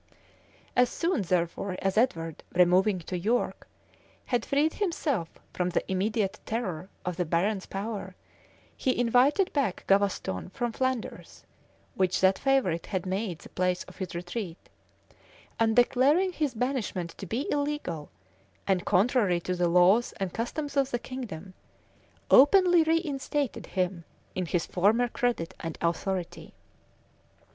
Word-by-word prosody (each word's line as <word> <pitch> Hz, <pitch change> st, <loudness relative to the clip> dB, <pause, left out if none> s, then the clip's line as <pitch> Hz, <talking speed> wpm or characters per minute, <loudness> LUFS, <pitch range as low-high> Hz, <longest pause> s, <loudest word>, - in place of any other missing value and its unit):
As 250 Hz, 0 st, +4 dB
soon, 340 Hz, -, 0 dB
therefore, 180 Hz, +1 st, -1 dB
as 195 Hz, -1 st, 0 dB
Edward, 165 Hz, -, 0 dB
removing 185 Hz, +3 st, +4 dB
to 180 Hz, -, -5 dB
York, 215 Hz, +8 st, -1 dB, 0.6 s
had 245 Hz, -3 st, 0 dB
freed 295 Hz, +3 st, +2 dB
himself 300 Hz, -, -1 dB, 0.2 s
from 180 Hz, 0 st, 0 dB
the 180 Hz, -, -2 dB
immediate 205 Hz, +1 st, 0 dB
terror 190 Hz, -6 st, -3 dB, 0.2 s
of 180 Hz, -1 st, -3 dB
the 180 Hz, -, +1 dB
barons' 185 Hz, +5 st, 0 dB
power, 195 Hz, -2 st, -5 dB, 0.6 s
he 255 Hz, -, 0 dB
invited 250 Hz, -, +3 dB
back 270 Hz, -11 st, -1 dB
Gavaston 195 Hz, -, +1 dB
from 240 Hz, -1 st, -2 dB
Flanders, 260 Hz, 0 st, -3 dB, 0.5 s
which 185 Hz, -1 st, +1 dB
that 190 Hz, 0 st, +4 dB
favorite 265 Hz, -12 st, +1 dB
had 185 Hz, -3 st, -2 dB
made 190 Hz, -1 st, -2 dB
the -, -, -12 dB
place 180 Hz, 0 st, 0 dB
of -, -, -15 dB
his 185 Hz, -3 st, -5 dB
retreat; 175 Hz, 0 st, -5 dB, 1.0 s
and 225 Hz, -1 st, +3 dB
declaring 275 Hz, +9 st, +4 dB
his 295 Hz, -7 st, -1 dB
banishment 220 Hz, -8 st, -2 dB
to 195 Hz, -, -6 dB
be 235 Hz, -, -2 dB
illegal, 285 Hz, -, -2 dB, 0.6 s
and 190 Hz, -3 st, +1 dB
contrary 200 Hz, -2 st, +3 dB
to 185 Hz, -, -2 dB
the 175 Hz, 0 st, +1 dB
laws 180 Hz, +7 st, +4 dB
and 190 Hz, -3 st, -4 dB
customs 285 Hz, +5 st, -3 dB
of 275 Hz, -1 st, +2 dB
the 245 Hz, -, -1 dB
kingdom,[*] 210 Hz, -9 st, -7 dB, 0.8 s
openly 350 Hz, +5 st, +7 dB
reinstated 295 Hz, -, -1 dB
him 180 Hz, -2 st, -2 dB, 0.3 s
in 185 Hz, -2 st, -2 dB
his 170 Hz, 0 st, 0 dB
former 215 Hz, +7 st, +2 dB
credit 235 Hz, -10 st, -1 dB
and 165 Hz, -1 st, -5 dB
authority. 175 Hz, +1 st, -3 dB
200 Hz, 135 wpm, -28 LUFS, 180-255 Hz, 1.0 s, openly